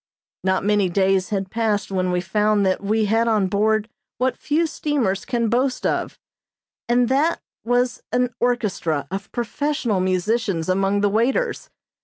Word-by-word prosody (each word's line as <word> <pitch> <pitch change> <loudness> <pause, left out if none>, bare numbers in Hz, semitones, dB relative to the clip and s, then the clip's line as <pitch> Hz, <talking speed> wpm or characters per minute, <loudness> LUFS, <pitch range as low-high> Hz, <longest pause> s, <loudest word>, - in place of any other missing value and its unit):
Not 190 0 +1
many 205 -2 +2
days 190 0 +1
had 195 -2 -2
passed 220 -3 -1
when 185 -1 0
we 180 0 0
found 210 +2 +1
that 185 -1 +1
we 215 +2 +1
had 225 +3 +2
on 215 -4 +2
board 215 +3 +1 0.3
what 255 +1 0
few 315 +3 0
steamers 280 -11 -1
can 235 -2 0
boast 255 +3 0
of, - - -1 0.7
and 245 0 +3
that 285 +6 +2 0.2
was 245 0 0
an 250 0 +1
orchestra 205 - -1
of 195 +1 -5
professional 240 -3 -1
musicians 185 -1 0
among 195 +2 +1
the 205 - +3
waiters. 240 - 0
215 Hz, 150 wpm, -22 LUFS, 195-245 Hz, 0.7 s, and